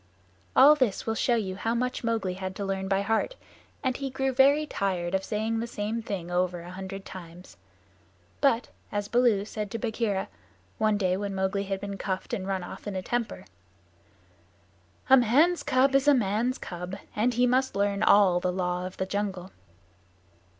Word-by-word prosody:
All 280 +3 +9
this 255 -9 0
will 225 - 0
show 240 +2 +2
you 195 -5 -2
how 225 +3 -1
much 250 +1 -2
Mowgli 225 -5 -1
had 190 0 -5
to 200 - -4
learn 190 0 -2
by 195 0 +1
heart, 225 - 0 0.5
and 260 -2 0
he 275 -1 -3
grew 265 +1 -1
very 280 +4 +5
tired 185 -9 -2
of 190 0 +1
saying 220 +2 -1
the 230 - -3
same 220 0 -3
thing 190 -6 -5
over 180 -1 0
a 175 +1 -9
hundred 190 +1 -7
times. 175 - -11 0.9
But, 250 -4 +2 0.2
as 205 0 -2
Baloo 235 -4 +3
said 210 -1 -5
to 230 - -4
Bagheera, 220 -4 -1 0.5
one 215 -1 +2
day 185 -2 +1
when 200 -1 -3
Mowgli 190 +1 -1
had 195 0 -3
been 200 0 -6
cuffed 190 +3 -3
and 195 -5 -2
run 190 -2 -1
off 175 - -9
in 205 - -4
a 185 - -3
temper, 240 +1 -3 1.6
"A 265 - +8
man's 285 +9 +4
cub 270 -1 +2
is 275 +1 +3
a 290 - +7
man's 230 +3 0
cub, 180 +1 -6 0.2
and 235 +3 +1
he 245 +1 +4
must 260 +2 +1
learn 200 0 0
all 200 -4 +5
the 180 0 0
Law 180 0 -2
of 185 - -11
the 190 - -1
Jungle." 190 -2 -3
205 Hz, 185 wpm, -27 LUFS, 190-240 Hz, 1.6 s, All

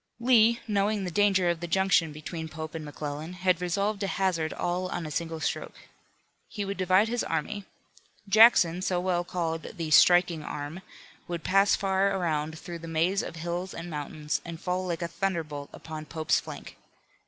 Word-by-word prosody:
Lee, 235 -1 +5
knowing 205 0 +1
the 180 - -3
danger 195 -1 +3
of 170 -1 +1
the 175 - -5
junction 170 -2 +2
between 160 +2 -6
Pope 155 -1 -7
and 160 -1 -5
McClellan 150 +2 -6
had 180 -1 +1
resolved 200 +4 0
to 200 - -1
hazard 180 -5 0
all 180 +1 -2
on 175 -2 -4
a 155 - -6
single 165 +1 -3
stroke. - - -3 0.7
He 205 -2 -4
would 200 0 -4
divide 185 +3 +3
his 240 +1 -1
army. 195 +6 -3 0.6
Jackson, 195 -5 +6
so 185 -2 0
well 175 -1 0
called 165 0 -4
"the 165 -2 -3
striking 175 +1 +6
arm," 150 +5 -6 0.5
would 170 -2 -4
pass 195 +1 +4
far 195 0 +1
around 160 -3 -1
through 170 +1 -7
the 165 - -9
maze 165 +5 +1
of - - -7
hills 175 +3 -4
and 165 +1 -7
mountains 150 0 -3
and 170 -1 -7
fall 185 +1 -2
like 170 -1 -2
a - - -1
thunderbolt 165 -6 -3
upon 155 -1 -8
Pope's 160 -1 +1
flank. - - -9
175 Hz, 175 wpm, -28 LUFS, 160-195 Hz, 0.7 s, Jackson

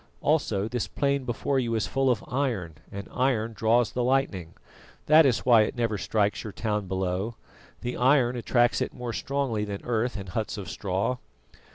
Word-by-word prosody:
Also 110 -10 +1
this 120 0 -2
plain 140 -2 0
before 130 +3 0
you 115 -2 -1
is 110 - 0
full 135 0 +1
of 120 -4 +1
iron, 120 - -1 0.2
and 100 0 -6
iron 120 -3 +1
draws 110 +2 +2
the 125 - -1
lightning. 120 -10 0 0.5
That 155 0 +7
is 120 -4 0
why 120 -3 +7
it 105 - 0
never 115 -4 0
strikes 105 0 0
your 110 - -7
town 105 -3 -2
below. 95 +4 -2 0.5
The 125 0 -3
iron 125 -1 +3
attracts 120 0 +2
it - - -2
more 120 -1 -4
strongly 140 -6 -1
than 100 -1 -5
earth 120 0 0
and 95 -2 -7
huts 110 +4 -3
of 100 0 -6
straw. 100 +6 -1
115 Hz, 180 wpm, -27 LUFS, 105-130 Hz, 0.5 s, That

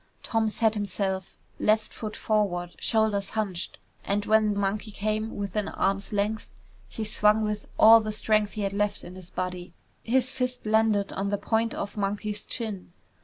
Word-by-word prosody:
Tom 225 -2 +1
set 220 0 +2
himself, 195 -2 -3 0.2
left 215 +1 +2
foot 215 -1 -6
forward, 185 -5 0
shoulders 215 -3 +1
hunched, 200 -6 -3 0.3
and 205 +1 -1
when 215 -1 +3
Monkey 200 +2 -1
came 215 +2 -2
within 200 +1 -2
arm's 195 +1 -1
length, 210 +1 -1 0.4
he 225 - -5
swung 215 0 +3
with 210 -1 -3
all 225 +1 +9
the 215 0 -3
strength 215 -1 +1
he 215 - -3
had 195 0 -1
left 205 0 -1
in 180 - -9
his 185 -1 -11
body. 180 -1 -5 0.3
His 255 +2 +2
fist 250 -2 -2
landed 215 -2 +2
on 195 +1 -2
the 205 - 0
point 225 +2 0
of 200 +1 -5
Monkey's 205 +1 -2
chin. 210 -7 -5
210 Hz, 165 wpm, -27 LUFS, 200-220 Hz, 0.4 s, all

